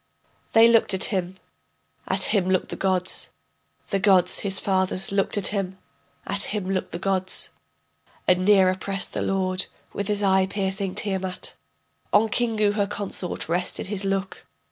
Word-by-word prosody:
They 225 Hz, +1 st, +8 dB
looked 230 Hz, -4 st, +4 dB
at 190 Hz, -, +1 dB
him, 185 Hz, 0 st, -2 dB, 0.7 s
at -, -, 0 dB
him 190 Hz, -4 st, +2 dB
looked 185 Hz, -1 st, +1 dB
the -, -, -4 dB
gods, 185 Hz, -1 st, +1 dB, 0.6 s
The 195 Hz, -, +1 dB
gods, 185 Hz, -2 st, +4 dB
his 195 Hz, -1 st, 0 dB
fathers, 190 Hz, -1 st, 0 dB
looked 200 Hz, +1 st, 0 dB
at 200 Hz, -, +2 dB
him; 190 Hz, -2 st, -3 dB, 0.5 s
at 200 Hz, +1 st, -1 dB
him 210 Hz, -2 st, -3 dB
looked 190 Hz, -1 st, -2 dB
the -, -, -5 dB
gods. 190 Hz, 0 st, 0 dB, 0.8 s
And 180 Hz, 0 st, +3 dB
nearer 190 Hz, -2 st, +5 dB
pressed 195 Hz, +1 st, -2 dB
the -, -, -2 dB
lord, 185 Hz, -1 st, +1 dB, 0.3 s
with 200 Hz, -, -3 dB
his 210 Hz, -1 st, -1 dB
eye 190 Hz, -1 st, +3 dB
piercing 195 Hz, -1 st, -2 dB
Tiamat. 190 Hz, -3 st, -3 dB, 0.6 s
On 220 Hz, +2 st, +4 dB
Kingu 220 Hz, -2 st, +1 dB
her 205 Hz, -1 st, 0 dB
consort 200 Hz, -3 st, -3 dB
rested 175 Hz, +3 st, -1 dB
his 200 Hz, 0 st, -4 dB
look. 195 Hz, 0 st, -2 dB
195 Hz, 155 wpm, -24 LUFS, 185-205 Hz, 0.8 s, They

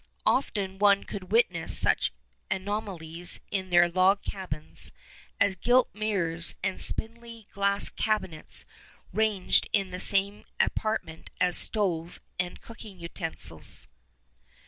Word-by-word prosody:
Often 195 Hz, -7 st, 0 dB
one 200 Hz, -1 st, +5 dB
could 195 Hz, -2 st, -8 dB
witness 185 Hz, -8 st, +4 dB
such -, -, +3 dB, 0.4 s
anomalies 185 Hz, -4 st, -3 dB
in 190 Hz, -2 st, -2 dB
their 175 Hz, -1 st, +6 dB
log 185 Hz, +3 st, +3 dB
cabins 165 Hz, -6 st, -1 dB, 0.5 s
as 200 Hz, -1 st, +3 dB
gilt 245 Hz, +7 st, +3 dB
mirrors 180 Hz, -6 st, 0 dB
and 190 Hz, -, -1 dB
spindly 230 Hz, -1 st, -2 dB
glass 200 Hz, 0 st, +2 dB
cabinets 190 Hz, -8 st, -2 dB, 0.5 s
ranged 215 Hz, -4 st, +2 dB
in 195 Hz, -3 st, +1 dB
the 180 Hz, -, -5 dB
same 200 Hz, +1 st, +2 dB, 0.2 s
apartment 215 Hz, -7 st, -1 dB
as 180 Hz, -1 st, +3 dB
stove 175 Hz, -6 st, +1 dB, 0.2 s
and 180 Hz, 0 st, -3 dB
cooking 215 Hz, -4 st, -12 dB
utensils. 160 Hz, -, -6 dB
195 Hz, 110 wpm, -28 LUFS, 175-210 Hz, 0.5 s, their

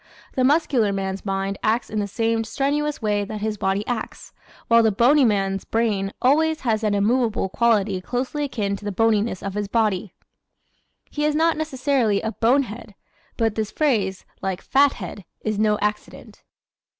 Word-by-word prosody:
The 255 Hz, -, +1 dB
muscular 265 Hz, -6 st, +3 dB
man's 195 Hz, 0 st, -4 dB
mind 195 Hz, 0 st, -2 dB
acts 225 Hz, +2 st, +1 dB
in 215 Hz, -, -3 dB
the 205 Hz, -, -1 dB
same 225 Hz, +2 st, 0 dB
strenuous 285 Hz, +4 st, -1 dB
way 205 Hz, -1 st, +1 dB
that 210 Hz, +1 st, -6 dB
his 215 Hz, -1 st, -2 dB
body 195 Hz, +2 st, 0 dB
acts, 240 Hz, -3 st, -5 dB, 0.3 s
while 230 Hz, 0 st, +6 dB
the 220 Hz, -1 st, +3 dB
bony 255 Hz, +8 st, +4 dB
man's 195 Hz, -4 st, +1 dB
brain 210 Hz, -4 st, 0 dB
always 315 Hz, +4 st, +3 dB
has 225 Hz, -4 st, 0 dB
an 210 Hz, -1 st, +1 dB
immovable 220 Hz, 0 st, +1 dB
quality 205 Hz, -4 st, +1 dB
closely 255 Hz, -, -2 dB
akin 210 Hz, -7 st, -2 dB
to 205 Hz, -, -15 dB
the 205 Hz, -, -2 dB
boniness 215 Hz, -1 st, +1 dB
of 200 Hz, -, -4 dB
his 205 Hz, 0 st, -2 dB
body. 210 Hz, -4 st, 0 dB, 1.0 s
He 295 Hz, -, -2 dB
is 300 Hz, 0 st, +1 dB
not 325 Hz, +1 st, +3 dB
necessarily 265 Hz, -8 st, 0 dB
a 220 Hz, -, -1 dB
"bonehead," 235 Hz, -3 st, 0 dB, 0.4 s
but 225 Hz, -2 st, +1 dB
this 215 Hz, -1 st, -2 dB
phrase, 210 Hz, -12 st, 0 dB, 0.2 s
like 190 Hz, -1 st, -3 dB
"fathead," 255 Hz, -8 st, +1 dB, 0.2 s
is 215 Hz, -1 st, -2 dB
no 210 Hz, -1 st, +3 dB
accident. 210 Hz, 0 st, -4 dB
220 Hz, 160 wpm, -23 LUFS, 200-255 Hz, 1.0 s, while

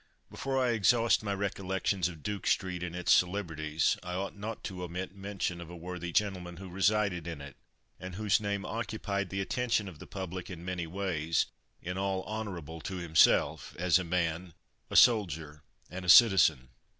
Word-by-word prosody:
Before 135 Hz, -1 st, -2 dB
I 125 Hz, -2 st, +2 dB
exhaust 115 Hz, +1 st, +3 dB
my 100 Hz, -2 st, -2 dB
recollections 95 Hz, -1 st, -1 dB
of 80 Hz, -5 st, -9 dB
Duke 105 Hz, -1 st, -3 dB
street 90 Hz, -2 st, 0 dB
and 90 Hz, -1 st, -4 dB
its 90 Hz, -1 st, 0 dB
celebrities, 80 Hz, -5 st, +1 dB
I 90 Hz, 0 st, -5 dB
ought 95 Hz, +2 st, -3 dB
not 105 Hz, +2 st, -6 dB
to 90 Hz, -2 st, -5 dB
omit 90 Hz, +2 st, -5 dB
mention 95 Hz, -3 st, -3 dB
of 85 Hz, -, -9 dB
a 90 Hz, -, -9 dB
worthy 90 Hz, 0 st, -6 dB
gentleman 90 Hz, -3 st, -1 dB
who 95 Hz, 0 st, -9 dB
resided 95 Hz, -2 st, +1 dB
in 85 Hz, -3 st, -5 dB
it, 70 Hz, 0 st, -10 dB, 0.4 s
and 90 Hz, 0 st, -7 dB
whose 105 Hz, +1 st, +2 dB
name 100 Hz, -1 st, -2 dB
occupied 105 Hz, -3 st, -3 dB
the 95 Hz, 0 st, -2 dB
attention 115 Hz, 0 st, 0 dB
of 85 Hz, -5 st, -10 dB
the -, -, -11 dB
public 95 Hz, -2 st, -6 dB
in 85 Hz, -2 st, -8 dB
many 90 Hz, -2 st, -3 dB
ways, 85 Hz, -3 st, 0 dB, 0.4 s
in 90 Hz, +2 st, -4 dB
all 95 Hz, -1 st, -1 dB
honourable 90 Hz, -7 st, -6 dB
to 95 Hz, -, -5 dB
himself, 85 Hz, -3 st, +3 dB
as 90 Hz, +1 st, +3 dB
a -, -, -2 dB
man, 85 Hz, 0 st, -2 dB, 0.3 s
a -, -, -6 dB
soldier, 80 Hz, -, +4 dB, 0.3 s
and 90 Hz, 0 st, -6 dB
a 90 Hz, -, -3 dB
citizen. 85 Hz, -, +7 dB
95 Hz, 175 wpm, -30 LUFS, 85-100 Hz, 0.4 s, citizen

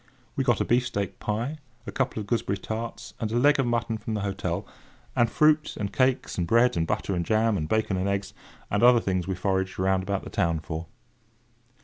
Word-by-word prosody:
We 135 Hz, -, +1 dB
got 120 Hz, -3 st, +2 dB
a -, -, +1 dB
beefsteak 120 Hz, -5 st, 0 dB
pie, 120 Hz, +9 st, -2 dB, 0.3 s
a -, -, -5 dB
couple 130 Hz, -4 st, -1 dB
of 105 Hz, -, -4 dB
gooseberry 100 Hz, -3 st, -1 dB
tarts, 110 Hz, +3 st, -5 dB
and 110 Hz, -1 st, -2 dB
a 120 Hz, -, +1 dB
leg 145 Hz, +3 st, +4 dB
of 135 Hz, -, +2 dB
mutton 115 Hz, -1 st, -1 dB
from 110 Hz, +1 st, -4 dB
the 105 Hz, -, -2 dB
hotel; 95 Hz, -1 st, -2 dB, 0.5 s
and 120 Hz, -, +3 dB
fruit, 155 Hz, 0 st, +3 dB
and 100 Hz, -2 st, -3 dB
cakes, 130 Hz, -7 st, +1 dB
and 85 Hz, -, 0 dB
bread 120 Hz, +4 st, +4 dB
and 80 Hz, -1 st, 0 dB
butter, 100 Hz, -, -1 dB
and 85 Hz, -2 st, 0 dB
jam, 110 Hz, +3 st, +2 dB
and 80 Hz, -5 st, -2 dB
bacon 110 Hz, -3 st, +1 dB
and 95 Hz, +2 st, 0 dB
eggs, 100 Hz, 0 st, -2 dB, 0.4 s
and 100 Hz, -, +1 dB
other 120 Hz, 0 st, +7 dB
things 95 Hz, -4 st, -1 dB
we 95 Hz, -, -1 dB
foraged 95 Hz, 0 st, -1 dB
round 95 Hz, 0 st, +2 dB
about 100 Hz, +1 st, -2 dB
the -, -, -8 dB
town 85 Hz, -5 st, +1 dB
for. 80 Hz, +1 st, -6 dB
105 Hz, 215 wpm, -26 LUFS, 95-120 Hz, 0.5 s, other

